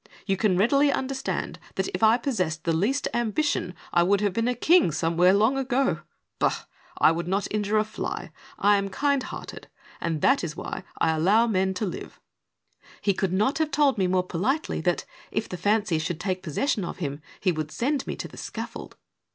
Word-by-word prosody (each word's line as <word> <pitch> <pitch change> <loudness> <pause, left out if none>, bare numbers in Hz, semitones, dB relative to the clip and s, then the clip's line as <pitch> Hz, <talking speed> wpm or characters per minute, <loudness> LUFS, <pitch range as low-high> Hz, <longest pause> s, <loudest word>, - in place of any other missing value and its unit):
You 195 -1 +1
can 190 -2 +2
readily 275 +8 +4
understand 265 0 -3 0.2
that, - - 0
if 390 - -4
I 220 +1 +6
possessed 185 - -2
the 165 - +1
least 230 - +1
ambition, 235 -4 0 0.2
I 175 - +5
would 195 +3 +3
have 205 -3 +1
been 230 +3 0
a 250 - +1
king 330 - +4
somewhere 165 +4 +3
long 220 +7 +3
ago. 270 0 +1 0.4
Bah - - +1 0.4
I - - +6
I - - +4
would 170 +1 -3
not 195 +2 0
injure 210 0 +1
a 215 - +4
fly; 215 0 -5 0.3
lam 200 -1 +4
kind 280 +6 +1
hearted, - - -8 0.3
and 165 -3 -1
that 270 -4 +4
is 160 -2 -4
why - - -5
I 160 - +3
allow 200 +9 +4
men 190 -4 +1
to 215 - -1
live! 180 - -7 0.4
" - - -57 0.3
He 200 - +2
could 190 -1 -1
not 215 +11 +1
have 315 -1 +1
told 275 -5 +2
me 185 - +3
more 180 0 +2
politely 230 - -1
that, 175 +1 0 0.2
if 215 - -2
the - - -5
fancy 205 -2 +1
should 160 +1 -3
take 185 -1 -2
possession 195 - -1
of 175 - -5
him, 145 -4 -4 0.2
he 185 - +2
would 155 -2 -3
send 270 - -1
me - - -3
to - - -6
the - - -14
scaffold. - - -7
200 Hz, 200 wpm, -26 LUFS, 180-250 Hz, 0.4 s, I